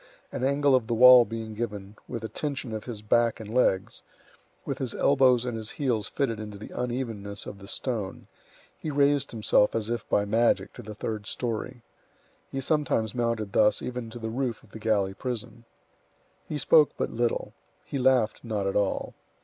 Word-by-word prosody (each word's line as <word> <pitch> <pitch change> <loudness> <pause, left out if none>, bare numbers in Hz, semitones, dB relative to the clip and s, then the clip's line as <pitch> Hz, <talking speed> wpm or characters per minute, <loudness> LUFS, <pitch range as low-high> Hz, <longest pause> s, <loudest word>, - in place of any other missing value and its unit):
An - - -4
angle 140 +1 +3
of 125 -4 +3
the 120 - 0
wall 125 0 +9
being 115 -1 -6
given, 105 -2 -5
with 115 - -5
the - - -2
tension 135 -3 -4
of 110 -1 -5
his 110 -4 -7
back 115 +1 +2
and 110 0 -8
legs, 95 -7 +1 0.6
with - - -3
his 130 -4 -2
elbows 130 -3 +4
and 120 -2 -3
his 110 -1 -4
heels 120 -8 0
fitted 115 -6 -1
into 105 -1 -7
the 105 - -10
unevenness 115 -5 -4
of 100 - -8
the 100 - -12
stone, 110 -4 -3 0.5
he 155 - -4
raised 140 -1 +2
himself 110 -2 +2
as 115 0 -1
if 120 - -4
by 100 - +2
magic 115 +3 +2
to - - -9
the 105 -2 -9
third 105 -1 -4
story. 120 +1 -3 0.7
He 135 - -3
sometimes 135 -7 0
mounted 115 -4 -1
thus 105 -1 +3
even 125 -2 -4
to 115 - -8
the 110 -1 -4
roof 125 -2 -2
of 105 - -21
the 110 - -9
galley 105 -3 +1
prison. 120 0 -6 0.8
He 150 - -2
spoke 150 0 +5
but - - -2
little. 120 0 -1 0.3
He 140 - -4
laughed 125 -4 +2
not 110 -4 -2
at 95 - -1
all. 100 -1 0
115 Hz, 185 wpm, -27 LUFS, 105-125 Hz, 0.8 s, wall